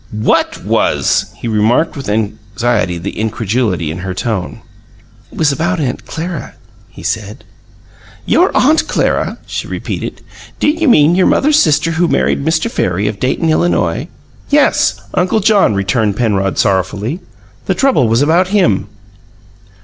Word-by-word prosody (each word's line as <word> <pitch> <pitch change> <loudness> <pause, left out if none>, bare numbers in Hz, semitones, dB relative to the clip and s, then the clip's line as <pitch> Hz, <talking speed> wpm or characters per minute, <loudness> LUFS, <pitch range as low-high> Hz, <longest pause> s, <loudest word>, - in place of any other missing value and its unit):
"WHAT 105 0 0
was?" - - +1
He - - -6
remarked 115 +8 +1
with 135 -6 -6
anxiety 105 -2 -1
the 90 +5 -6
incredulity 110 -6 -1
in 85 - -6
her 95 0 -5
tone. 95 -3 -3 0.7
"It - - -14
was 155 -3 +2
about 170 +5 -1
Aunt 135 -5 -3
Clara," 170 +2 -5 0.3
he - - -13
said. - - -4 0.8
"Your 360 +3 +3
Aunt 305 +5 +3
Clara!" - - 0
she - - -5
repeated. - - -5 0.4
"Do - - +1
you 325 +1 0
mean 155 - +5
your 185 +1 +3
mother's 300 +2 +3
sister 155 +1 +2
who 170 +2 +1
married 140 - 0
Mr. 160 +5 +1
Farry 100 - -1
of 105 -1 -4
Dayton, 160 +5 0
Illinois?" 125 - 0 0.4
"Yes 95 0 +2
Uncle 185 +4 +1
John," 200 - +3
returned 100 +2 0
Penrod 100 -5 0
sorrowfully. 100 - 0 0.5
"The 190 - +1
trouble 210 - +2
was 115 +5 +2
about 170 +5 +3
him." 145 - +1
120 Hz, 140 wpm, -14 LUFS, 100-170 Hz, 0.8 s, mean